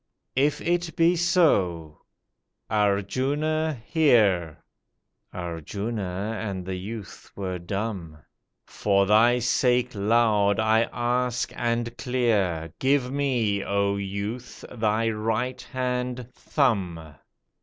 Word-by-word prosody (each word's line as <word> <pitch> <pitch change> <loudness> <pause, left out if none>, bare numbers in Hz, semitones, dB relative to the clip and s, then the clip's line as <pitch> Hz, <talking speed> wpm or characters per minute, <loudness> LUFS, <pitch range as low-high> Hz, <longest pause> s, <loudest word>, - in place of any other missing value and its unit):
"If 140 +3 +2
it 175 0 -1
be 170 +2 +4
so, 100 - +2 0.7
Arjuna 130 +9 0
hear!" 105 - +2 0.7
Arjuna 100 +4 -4
and 95 -4 -4
the 95 - -4
youth 100 +3 -7
were 95 -2 -4
dumb, 95 -3 -4 0.5
"For 100 -1 +1
thy 110 +4 +5
sake, 125 +1 +1
loud 105 -1 +2
I 110 +1 +3
ask 125 0 -1
and 120 -1 -1
clear, 100 -11 0
Give 135 -1 +2
me, 120 -8 0
O 100 0 0
youth, 100 +5 -5
thy 110 -1 0
right 110 +4 -2
hand 125 -1 -3
thumb. 90 - -1
110 Hz, 95 wpm, -25 LUFS, 100-125 Hz, 0.7 s, thy